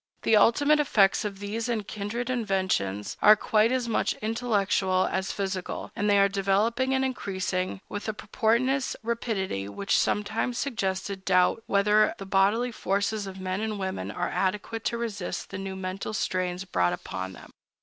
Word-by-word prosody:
The 225 - +4
ultimate 290 +8 +5
effects 210 -9 +3
of 200 -2 -4
these 215 +4 -4
and 215 -4 -2
kindred 230 +4 -3
inventions 190 - -1
are 215 +1 +8
quite 215 +2 +2
as 255 -2 0
much 225 - +1
intellectual 205 -5 +1
as 190 0 -1
physical, 190 -2 -4
and 205 +1 0
they 200 - +5
are 200 0 +6
developing 205 +7 +1
and 265 0 +1
increasing 190 -6 -2
with 205 +1 -5
a - - -1
portentous 250 +5 +1
rapidity 205 - -2
which 195 - -1
sometimes 215 +4 0
suggests 195 -8 -1
a - - -2
doubt 190 +1 +2
whether 210 +2 +3
the 195 - -7
bodily 205 +6 +2
forces 200 -1 -1
of 190 0 -8
men 185 +1 -2
and 220 -1 -2
women 190 - -3
are - - -2
adequate 210 +4 -2
to 235 - 0
resist 210 -6 -4
the - - -5
new 195 0 -5
mental 190 +3 -4
strains 185 -2 -1
brought 90 - +1
upon 95 +1 -5
them. - - -13
200 Hz, 165 wpm, -27 LUFS, 190-225 Hz, -, are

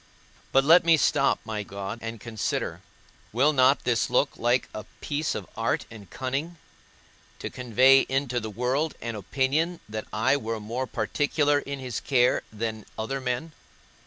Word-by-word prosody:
But 135 - +5
let 165 +5 +7
me 165 -1 +5
stop, 140 -1 +2
my 110 -1 -3
God, 100 +2 -6
and 115 0 -6
consider; 110 -1 -3 0.5
will 135 +7 +3
not 130 0 +4
this 120 -2 +1
look 130 +3 +2
like 120 +1 +1
a 105 - -6
piece 150 +1 -2
of 100 - -5
art 115 +1 -1
and 105 -4 -12
cunning, 140 +7 -3 0.8
to - - -6
convey 130 +2 +4
into 130 -2 0
the 110 -1 -5
world 125 +8 -1
an 115 0 -4
opinion 140 - 0
that 110 0 -5
I 130 +6 +2
were 115 -4 -4
more 120 +5 -4
particular 145 +1 +1
in 140 0 -5
his 125 -4 -4
care 125 -3 +2
than 110 0 -4
other 135 +5 -3
men? 125 +5 -2
125 Hz, 160 wpm, -26 LUFS, 110-140 Hz, 0.8 s, let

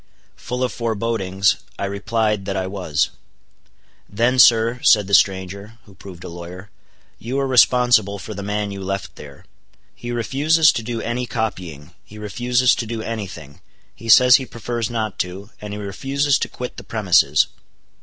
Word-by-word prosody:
Full 125 +1 -4
of 125 - 0
forebodings, 110 -4 0 0.2
I - - -3
replied 105 +1 -1
that 100 -1 -3
I 95 - -1
was. 90 -6 -1 1.0
"Then 120 +5 +1
sir," 115 +1 +5
said 105 -3 +5
the 100 - -7
stranger, 100 +3 +1
who 100 - -17
proved 95 -2 -12
a - - -7
lawyer, 90 +3 -10 0.5
"you 125 +4 -4
are 135 - 0
responsible 125 -5 +4
for 105 +2 -8
the 100 - -6
man 105 0 -3
you 100 0 -7
left 100 +1 -4
there. 70 -2 -13 0.5
He 120 - -9
refuses 145 +7 +3
to - - -3
do 115 0 -4
any 125 +1 -3
copying; 90 - -5
he 105 - -14
refuses 120 +4 +1
to 115 - -3
do 115 -1 -4
any 110 -3 -4
thing; 70 -5 -12 0.3
he 115 - -10
says 125 +2 +8
he 130 - -6
prefers 115 0 -4
not 110 -3 -3
to; 95 +4 -5
and 105 -1 -7
he 105 - -5
refuses 135 +8 -1
to - - -2
quit 125 0 -7
the - - -8
premises." 105 -6 +3
110 Hz, 170 wpm, -20 LUFS, 100-120 Hz, 1.0 s, says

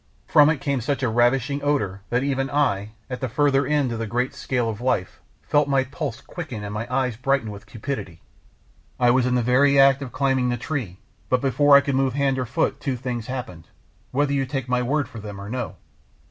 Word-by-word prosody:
From 150 0 +6
it 150 -3 0
came 140 -3 -1
such 140 +2 -2
a 125 - +2
ravishing 125 +4 +2
odour 100 -10 0
that 125 +2 +1
even 135 -1 -1
I, 110 -8 0
at 125 -1 -6
the 130 - -2
further 140 +1 +2
end 145 -4 +1
of 115 - -3
the 115 - -3
great 125 +4 -1
scale 125 -3 -1
of 110 0 -4
life, 120 -7 -1 0.2
felt 145 -1 +2
my 135 -1 +2
pulses 135 -2 -5
quicken 140 -12 -7
and 105 0 -5
my 115 +4 -5
eyes 125 -2 0
brighten 130 -3 0
with 100 0 -11
cupidity. 105 - -5 0.8
I 120 -1 +5
was 125 0 +3
in 125 - +1
the 125 - +2
very 140 +3 +4
act 135 0 +6
of 130 -4 -6
climbing 130 -1 +1
the 120 - -1
tree, 120 - -4 0.3
but 125 - +3
before 140 +2 +4
I 140 - +8
could 140 -1 -2
move 135 -1 +1
hand 135 -2 +1
or 125 - -2
foot 135 +4 0
two 135 -3 -2
things 120 -2 -4
happened, 120 -11 -6 0.4
whether 140 +1 0
you 135 -1 0
take 135 -2 -3
my 125 0 +1
word 140 +2 0
for 115 - -10
them 105 -1 -8
or 100 +1 -7
no. 125 -2 -4
130 Hz, 220 wpm, -23 LUFS, 115-140 Hz, 0.8 s, I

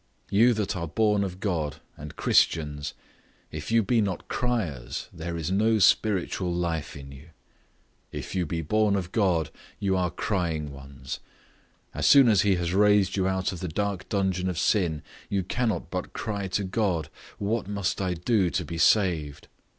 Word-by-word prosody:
You 115 +4 +5
that 105 -3 -1
are 85 -2 -3
born 105 +4 +2
of 95 -1 -5
God, 80 -8 -1 0.2
and 75 0 -9
Christians, 75 -3 +1 0.6
if 75 +6 -6
you 115 -1 +4
be 115 +2 +2
not 100 -4 -3
criers, 85 - -2
there 85 +1 -5
is 80 +2 -3
no 110 +3 +3
spiritual 95 -3 +2
life 85 -4 -2
in 70 0 -10
you; 70 +3 -13 0.8
if - - -6
you 90 -3 0
be 80 +1 -3
born 105 +5 +2
of 90 -2 -3
God, 90 -7 +1 0.3
you 95 -1 +1
are 90 -1 +1
crying 85 -5 -2
ones; 70 -1 -8 0.7
as - - 0
soon 135 -4 +8
as 100 -4 +5
he 100 -2 +3
has 85 0 -2
raised 105 -1 +4
you 95 -2 +1
out 95 0 0
of 90 - -7
the 90 - -4
dark 100 +2 -3
dungeon 95 -2 0
of 90 - -3
sin, 85 -5 +1 0.3
you 100 -2 0
cannot 115 +4 -2
but - - -4
cry 100 -2 -3
to 95 +2 -1
God, 95 -6 -1 0.3
What 105 +1 -1
must 100 -1 -2
I 90 -2 -1
do 95 +1 +1
to 90 0 -2
be 85 +2 -5
saved? 80 -8 +2
95 Hz, 175 wpm, -26 LUFS, 80-100 Hz, 0.8 s, soon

